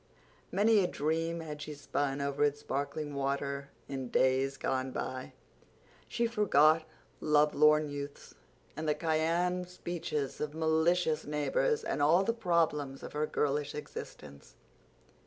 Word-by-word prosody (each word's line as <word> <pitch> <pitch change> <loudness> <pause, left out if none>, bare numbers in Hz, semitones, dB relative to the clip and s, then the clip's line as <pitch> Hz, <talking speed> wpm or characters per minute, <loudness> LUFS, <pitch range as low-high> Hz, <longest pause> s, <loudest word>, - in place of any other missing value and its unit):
Many 215 +2 +4
a - - +2
dream 165 +3 -1
had 150 -2 -7
she 150 0 -6
spun 140 -1 -2
over 140 +1 0
its 145 0 +1
sparkling 145 +1 -3
water 140 0 -2 0.2
in 135 -3 -5
days 135 +2 +2
gone 130 0 -1
by. 130 0 -5 0.7
She 235 0 0
forgot 165 -9 +4 0.3
lovelorn 150 0 +4
youths, 145 0 -7 0.4
and 155 0 -2
the 150 - +2
cayenne 170 +3 0
speeches 170 -5 -4
of 150 0 -3
malicious 160 0 +2
neighbors, 450 - 0
and 145 - -2
all 165 +6 +5
the 230 - +1
problems 165 -10 0
of - - -8
her 150 +1 0
girlish 145 0 -1
existence. 70 - -9
150 Hz, 130 wpm, -31 LUFS, 140-165 Hz, 0.7 s, all